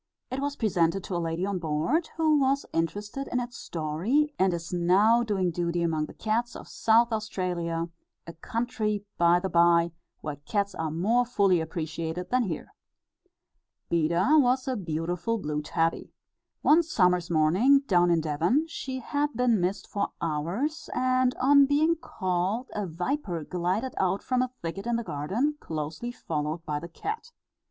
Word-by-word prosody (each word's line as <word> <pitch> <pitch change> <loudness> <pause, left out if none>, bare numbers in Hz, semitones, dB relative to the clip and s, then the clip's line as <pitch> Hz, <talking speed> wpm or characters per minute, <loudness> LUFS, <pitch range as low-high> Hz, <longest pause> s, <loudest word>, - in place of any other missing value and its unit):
It 260 - -2
was 285 +1 -2
presented 185 -5 +1
to 185 - -4
a 170 - 0
lady 165 +2 -2
on 200 -2 -2
board, 165 - 0
who 310 -2 +3
was 275 +1 +1
interested 205 +11 -2
in 250 - -1
its 245 +1 -5
story, 180 - -1
and 190 0 +4
is 170 0 -5
now 195 +7 +4
doing 195 -6 0
duty 170 0 -1
among 155 -2 0
the - - -13
cats 230 +2 -1
of - - -9
South 230 +1 +3
Australia, 175 -6 -2 0.4
a 170 - -8
country, 215 +2 -2
by 170 +1 +5
the 190 - -2
bye, 170 -1 +4 0.3
where 150 -2 -5
cats 200 +8 -2
are 160 -1 -3
more 205 +10 +2
fully 200 -8 +2
appreciated 160 +2 -4
than 255 -1 +2
here. 170 -6 -5 1.2
Beda 170 - +3
was 255 -1 +2
a 260 - 0
beautiful 175 +3 -2
blue 150 -6 -3
tabby. 165 +2 -1 0.5
One 315 +3 +6
summer's 180 - +2
morning, 180 - +4
down 175 -6 +3
in 170 -1 +3
Devon, 165 - +1
she 260 -5 -5
had 290 +4 -1
been 235 -4 +2
missed 185 +3 -1
for 200 -1 -2
hours, 175 - -2
and 255 0 +2
on 280 +1 +5
being 310 +4 +3
called, 190 - -2
a 210 -2 -2
viper 175 - -3
glided 180 - -2
out 190 +1 0
from 255 -1 +1
a 255 - 0
thicket 195 +6 -4
in 240 - +1
the 235 - -1
garden, 220 - -1
closely 160 +9 -4
followed 160 -5 -4
by 150 -1 -2
the 170 +3 -9
cat. 435 - -5
190 Hz, 160 wpm, -27 LUFS, 170-250 Hz, 1.2 s, One